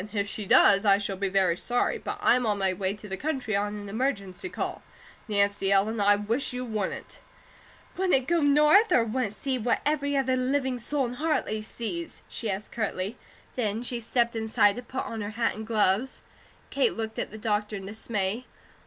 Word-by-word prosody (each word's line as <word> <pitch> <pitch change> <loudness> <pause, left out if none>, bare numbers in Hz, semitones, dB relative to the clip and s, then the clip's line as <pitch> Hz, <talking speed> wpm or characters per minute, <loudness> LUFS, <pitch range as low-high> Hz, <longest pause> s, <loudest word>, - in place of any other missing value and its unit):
"If 200 -2 0
she 205 0 -5
does, 200 +1 +6
I 200 -2 +5
shall 200 -1 -3
be 195 +1 -1
very 185 -3 +3
sorry, 245 +7 0
but - - -5
I'm 250 0 +4
on 210 -1 +1
my 190 -1 +1
way 190 +1 -2
to 210 0 -11
the 190 - -4
country 265 -7 -2
on 205 +1 -1
an 205 -1 -7
emergency 205 - -2
call. - - -4 0.5
Nancy 200 -2 +1
Ellen, 205 +3 +2
I 205 0 +5
wish 225 +6 -2
you 250 0 -3
wouldn't!" 215 -5 -4 0.7
"Wouldn't 360 -9 +1
go 340 0 +2
North, 300 +9 +5
or 240 - +5
wouldn't 225 -2 -2
see 265 +1 -2
what 235 +1 +1
every 285 -1 +1
other 260 -1 +2
living 260 0 0
soul 275 +3 0
in 240 - -4
Hartley 300 -9 0
sees?" 275 +10 -5
she 225 - -4
asked 195 +2 -4
curtly. 210 -2 -3 0.4
Then 225 -2 -1
she 245 -1 -3
stepped 235 +1 0
inside 220 -1 +2
to - - -4
put 260 +2 -5
on 225 -1 -5
her 205 - -3
hat 235 - +1
and 220 +1 -7
gloves. 220 +3 +1 0.5
Kate 470 - +1
looked 220 -1 -4
at - - -2
the 215 - -9
doctor 210 -1 -1
in 195 -1 -6
dismay. 215 +2 -2
220 Hz, 195 wpm, -27 LUFS, 200-255 Hz, 0.7 s, does